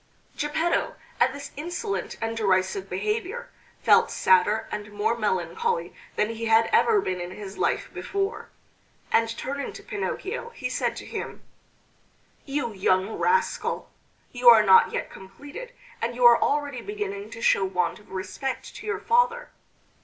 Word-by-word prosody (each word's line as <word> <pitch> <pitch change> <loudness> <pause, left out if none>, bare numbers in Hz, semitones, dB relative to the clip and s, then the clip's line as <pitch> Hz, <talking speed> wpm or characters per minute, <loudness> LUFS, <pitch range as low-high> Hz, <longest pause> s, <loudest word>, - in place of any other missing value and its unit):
Geppetto 320 +3 0 0.2
at 250 +2 +4
this 285 +1 -8
insolent 350 +8 -4
and 225 0 -2
derisive 200 - +1
behavior 435 +3 -3 0.3
felt - - +5
sadder 190 +4 +3
and 210 0 -5
more 210 +3 0
melancholy 345 - -1 0.2
than 210 - +1
he 230 0 -5
had 225 0 +4
ever 440 -3 +5
been 185 - -3
in 175 - -5
his 195 +1 -9
life - - 0
before; 395 +2 -3 0.6
and 230 0 +3
turning 280 +1 -4
to - - -10
Pinocchio 410 +2 -4
he - - -3
said - - -1
to - - -8
him: - - -6 1.0
"You 275 -5 -2
young 190 +1 +1
rascal! 470 +1 0 0.4
You 245 -1 +6
are 225 -2 +8
not 190 -2 +6
yet - - -3
completed, 285 - -10 0.3
and 235 +1 -2
you 245 0 +2
are 235 -1 +8
already 285 -4 0
beginning 410 -1 -5
to 230 - -9
show 195 - +4
want 180 -2 -1
of 210 - -20
respect 190 +8 -5
to - - -9
your 430 - -1
father! 485 +1 +1
245 Hz, 150 wpm, -26 LUFS, -, 1.0 s, are